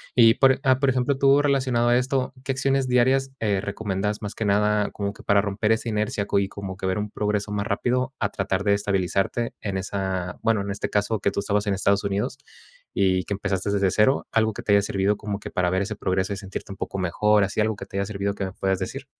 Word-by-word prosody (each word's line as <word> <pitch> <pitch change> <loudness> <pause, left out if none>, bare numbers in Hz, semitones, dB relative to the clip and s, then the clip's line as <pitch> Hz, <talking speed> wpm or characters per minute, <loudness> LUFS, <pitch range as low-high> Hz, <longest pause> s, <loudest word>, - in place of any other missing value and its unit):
Y 115 -2 +7
por 135 -1 +5
e - - -6
a 130 -1 +3
por 140 -1 +2
ejemplo, 130 +2 +1
tú 140 +1 +5
relacionado 130 -4 +2
a 120 - +5
esto, 130 +1 -1
¿qué 135 - -1
acciones 135 0 +1
diarias, 130 +2 +2
eh, 100 -3 +1
recomiendas, 105 0 -3
más 105 0 -5
que 110 - -3
nada, 105 +1 +2
como 100 -1 -3
que - - -14
para 100 -1 +3
romper 105 +2 +1
esa 115 +1 -2
inercia 105 -1 -1
co 100 - +2
y 100 - 0
como 100 -1 -7
que 95 - -5
ver 95 - 0
un 105 0 -3
progreso 105 0 -1
más 105 +1 -2
rápido 125 +5 0
a 105 - 0
tratar 100 -1 -2
de 100 -1 +3
estabilizarte 100 +3 0
en 100 -2 -3
esa, 95 -2 -3
bueno, 115 -3 +2
en 100 0 -4
este 100 - -3
caso 105 +1 0
que 100 - +1
tú - - -2
estabas 105 +1 -1
en 100 - +2
Estados 100 +1 +1
Unidos 105 +7 -1 0.6
y 95 -1 +2
que 100 - -3
empezaste 100 -1 -2
desde 100 -2 +2
cero? 110 +8 +2
¿Algo 110 0 +2
que - - -7
te 105 - 0
haya 100 - +6
servido 100 0 0
como 105 -1 -4
que - - -8
para 90 -2 +1
ver 95 +2 +1
ese 110 +2 -4
progreso 95 +1 -1
y - - -5
sentirte 95 0 -7
un 95 - -8
poco 100 - -4
mejor, 105 +4 +2
así 100 +2 0
algo 110 0 +1
que 100 - -8
te 100 - -7
haya 100 - 0
servido 100 0 -2
que 100 -1 -3
me 95 - -6
puedas 95 -1 -1
decir? 135 +8 -5
105 Hz, 250 wpm, -24 LUFS, 100-115 Hz, 0.6 s, Y